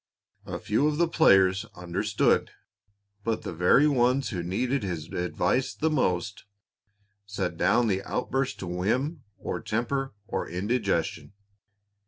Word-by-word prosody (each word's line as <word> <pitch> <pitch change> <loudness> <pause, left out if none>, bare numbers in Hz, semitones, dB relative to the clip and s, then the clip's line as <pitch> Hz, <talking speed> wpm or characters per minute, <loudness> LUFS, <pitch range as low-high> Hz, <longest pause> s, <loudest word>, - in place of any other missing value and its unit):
A - - -4
few 110 +8 +1
of 150 -1 0
the 170 +1 +3
players 95 - +4
understood, 90 +4 +1 0.7
but 115 0 -1
the - - -5
very 90 - +4
ones 130 -1 +2
who 90 -5 -3
needed 125 +10 -1
his 85 -6 -4
advice 90 +8 0
the 160 +1 0
most 95 - -1 0.8
set 95 -4 -3
down 100 +8 +3
the 95 -3 0
outburst 135 +5 -2
to - - -4
whim 125 - -1 0.2
or - - -4
temper 135 +3 -2
or - - -3
indigestion. 100 0 -1
105 Hz, 130 wpm, -27 LUFS, 90-135 Hz, 0.8 s, players